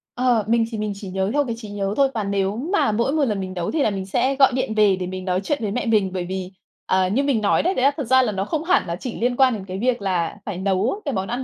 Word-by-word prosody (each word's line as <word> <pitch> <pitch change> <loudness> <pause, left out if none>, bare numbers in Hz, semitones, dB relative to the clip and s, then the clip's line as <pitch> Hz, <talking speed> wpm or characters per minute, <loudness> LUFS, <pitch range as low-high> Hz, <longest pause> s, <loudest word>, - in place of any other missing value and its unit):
Ờ, 245 -4 +2
mình 230 0 +3
thì 225 - -4
mình 210 0 -2
chỉ 195 -1 -8
nhớ 190 +1 -1
theo 290 0 +2
cái 230 -3 -3
trí 220 -3 -9
nhớ 200 -1 -2
thôi 275 -1 +5
và 220 - -2
nếu 200 +1 -1 0.2
mà 315 - +3
mỗi 235 +5 0
một 305 -2 +2
lần 210 -5 -1
mình 185 -1 -5
nấu 175 -2 -3
thì 315 - 0
là - - +3
mình 195 -2 -4
sẽ 260 +8 0
gọi 270 -1 +5
điện 255 -3 -1
về 210 -3 +4
để 185 -1 -4
mình 185 0 -6
nói 185 0 0
chuyện 290 +8 0
với 210 -3 -2
mẹ 245 - -2
mình, 210 -5 +2
bởi 180 -2 -3
vì, 185 0 -5 0.3
à, 185 0 +2
như 230 +9 +1
mình 275 -6 +1
nói 205 - +2
đấy, 360 +4 +1
đấy 255 - -1
là 280 - +5
thật 295 - -2
ra 260 +2 +5
là 245 -4 0
nó 195 -1 -2
không 315 +6 -2
hẳn 365 +2 +2
là 170 - -2
chỉ 230 +6 -6
liên 245 +1 +1
quan 260 -1 +4
đến 200 -4 -5
cái 185 0 -6
việc 245 0 0
là 185 -2 -1
phải 205 -4 -4
nấu 195 - 0
cái 280 - -1
món 190 -2 -2
ăn 245 +4 -3
210 Hz, 320 wpm, -22 LUFS, 190-255 Hz, 0.3 s, thôi